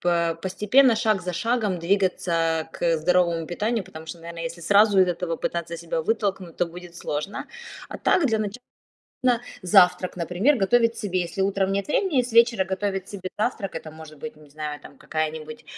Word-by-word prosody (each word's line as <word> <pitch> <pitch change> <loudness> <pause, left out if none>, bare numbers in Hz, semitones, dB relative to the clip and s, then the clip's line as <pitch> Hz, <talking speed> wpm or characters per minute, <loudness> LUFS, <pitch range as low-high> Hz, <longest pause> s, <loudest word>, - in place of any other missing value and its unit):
по 170 -1 +1
постепенно, 215 +6 +4
шаг 215 -4 +1
за 180 - -3
шагом 210 0 0
двигаться, 185 0 0
э, 165 -1 +1
к 170 -1 +1
здоровому 170 -1 +2
питанию. 215 +3 -1
Потому 160 -3 -11
что, 170 - -7
наверно, 170 0 -8
если 165 +1 -5
сразу 205 +3 +5
из 185 - +5
этого 170 -1 -2
пытаться 170 0 -3
себя 165 -1 -3
вытолкнуть, 195 -5 -2
то 175 - +1
будет 175 0 -11
сложно. 150 +7 -4 0.4
А - - -6
так, 340 - +3
для 225 -4 +1
начала 215 +3 -4 1.0
завтрак, 185 -1 +4
например, 180 - +2
готовить 230 +4 +3
себе. 185 -4 -1
Если 170 +3 -5
утром 195 0 +1
нет 200 +4 -2
времени, 300 -3 +2
с 245 - -7
вечера 230 -4 +5
готовить 190 0 -3
себе 190 -2 -6
завтрак, 210 -3 -2
это 160 -1 -6
может 155 -1 -12
быть, 235 0 -7
не 150 -2 -18
знаю, 150 0 -5
там, 140 - -14
какая-нибудь 155 0 -4
185 Hz, 180 wpm, -24 LUFS, 165-210 Hz, 1.0 s, сразу